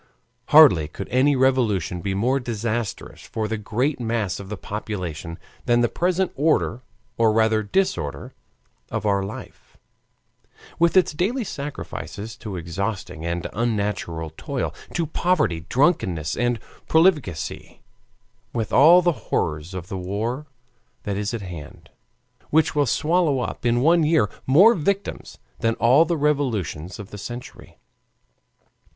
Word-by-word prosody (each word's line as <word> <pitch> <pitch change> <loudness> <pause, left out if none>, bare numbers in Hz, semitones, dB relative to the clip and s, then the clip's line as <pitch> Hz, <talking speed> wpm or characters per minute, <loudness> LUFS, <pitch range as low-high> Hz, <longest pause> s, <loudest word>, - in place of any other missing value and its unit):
Hardly 140 - +7
could 95 +6 -7
any 135 +3 +3
revolution 115 -10 +1
be 95 +2 -2
more 125 +7 +1
disastrous 115 -2 -4
for 110 -1 -4
the 110 - -2
great 125 +8 -1
mass 115 -5 -1
of 100 -1 -9
the 105 - -5
population 90 -7 -5 0.3
than 120 0 +4
the 120 - +2
present 180 +1 0
order 145 -5 +1 0.4
or 115 -1 +5
rather 110 0 +3
disorder 100 - -1 0.6
of - - -3
our 100 -1 +2
life, 100 +2 -9 1.0
with 170 +2 +4
its 180 -4 +4
daily 215 - 0
sacrifices 135 - -6
to 105 -3 -7
exhausting 90 0 -4
and 85 0 -3
unnatural 100 -8 -2
toil, - - -3 0.2
to 170 - +1
poverty, 150 - 0
drunkenness, 95 - +1
and 120 -1 0 0.3
profligacy, 155 - +1 0.7
with 115 -3 -3
all 170 +7 +7
the 175 - +4 0.2
horrors 75 +5 -1
of 90 -1 -6
the 95 -1 -5
war 110 +10 -3 0.6
that 100 - -2
is 105 +1 -2
at 115 -4 -4
hand, 85 -5 -10 0.6
which 160 +1 +3
will 145 -2 +2
swallow 155 +1 +2
up 125 - -3
in 120 +1 +2
one 165 +4 +4
year 155 -9 +2 0.2
more 185 - +7
victims 200 +2 -2 0.2
than 115 0 +1
all 130 +8 +5
the 170 0 -1
revolutions 115 - -1
of 105 -3 -10
the 105 - -8
century. 120 +4 -9
115 Hz, 135 wpm, -23 LUFS, 100-150 Hz, 1.0 s, Hardly